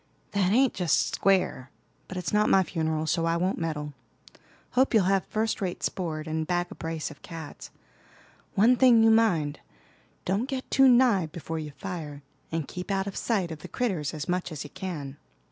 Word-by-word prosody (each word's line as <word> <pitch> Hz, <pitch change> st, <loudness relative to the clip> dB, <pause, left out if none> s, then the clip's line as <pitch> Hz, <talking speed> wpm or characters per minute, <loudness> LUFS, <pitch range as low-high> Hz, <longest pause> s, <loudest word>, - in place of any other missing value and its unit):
"That 195 Hz, -2 st, +1 dB
ain't 260 Hz, +3 st, +4 dB
just 175 Hz, -6 st, +1 dB
square; 185 Hz, -9 st, +1 dB, 0.4 s
but 185 Hz, -, -7 dB
it's 180 Hz, +2 st, -3 dB
not 210 Hz, 0 st, +3 dB
my 190 Hz, -, +5 dB
funeral, 160 Hz, -3 st, -2 dB
so 165 Hz, +1 st, 0 dB
I 165 Hz, 0 st, +1 dB
won't 185 Hz, +3 st, 0 dB
meddle. 150 Hz, -3 st, -3 dB, 0.8 s
Hope 255 Hz, -1 st, +2 dB
you'll 215 Hz, -, +5 dB
have 195 Hz, +1 st, +1 dB
first 220 Hz, 0 st, -1 dB
rate 180 Hz, -2 st, -3 dB
sport, 160 Hz, -4 st, -2 dB
and 160 Hz, 0 st, -2 dB
bag 175 Hz, 0 st, -1 dB
a -, -, -5 dB
brace 160 Hz, -1 st, -4 dB
of 145 Hz, -, -14 dB
cats. 160 Hz, -3 st, -9 dB, 0.9 s
One 230 Hz, +6 st, +5 dB
thing 240 Hz, -3 st, +6 dB
you 225 Hz, -, +6 dB
mind, 175 Hz, -10 st, +2 dB, 0.7 s
don't 205 Hz, +8 st, 0 dB
get 265 Hz, -2 st, -4 dB
too 270 Hz, 0 st, +6 dB
nigh 240 Hz, -8 st, +4 dB
before 160 Hz, +1 st, -5 dB
you 155 Hz, -1 st, -5 dB
fire; 150 Hz, -3 st, -7 dB, 0.3 s
and 160 Hz, -3 st, -2 dB
keep 180 Hz, +2 st, -7 dB
out 195 Hz, -1 st, 0 dB
of 200 Hz, -, -6 dB
sight 195 Hz, -7 st, -1 dB
of 160 Hz, -, -7 dB
the -, -, -9 dB
critters 185 Hz, -, -2 dB
as 155 Hz, 0 st, -5 dB
much 180 Hz, -1 st, -1 dB
as 150 Hz, -3 st, -5 dB
you 145 Hz, -, -11 dB
can." 160 Hz, -8 st, -6 dB
180 Hz, 190 wpm, -27 LUFS, 155-205 Hz, 0.9 s, thing